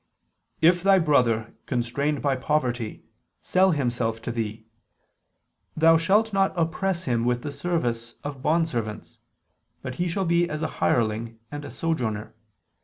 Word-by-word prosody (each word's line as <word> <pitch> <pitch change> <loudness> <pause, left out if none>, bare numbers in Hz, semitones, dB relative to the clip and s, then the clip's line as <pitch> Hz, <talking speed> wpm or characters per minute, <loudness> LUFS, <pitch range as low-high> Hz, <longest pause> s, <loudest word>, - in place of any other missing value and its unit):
"If 175 +2 +5
thy 195 +1 +5
brother, 125 -9 +2
constrained 140 +4 -1
by 140 -2 +2
poverty, 125 -5 -1 0.4
sell 190 +1 +3
himself 120 -7 0
to 120 - -3
thee, 110 -1 -4 1.1
thou 165 +1 +6
shalt 205 +6 +2
not 195 -1 +1
oppress 170 +2 0
him 120 -6 0
with 120 0 0
the 145 - -4
service 120 -9 -2
of 145 -2 -6
bondservants: 140 -9 -1 0.7
but 130 - -4
he 180 - +1
shall 190 +3 -1
be 170 +1 +2
as 150 +1 -3
a - - +1
hireling 115 0 0
and 145 0 -6
a 145 - -7
sojourner 120 -10 -2
145 Hz, 140 wpm, -25 LUFS, 120-170 Hz, 1.1 s, thou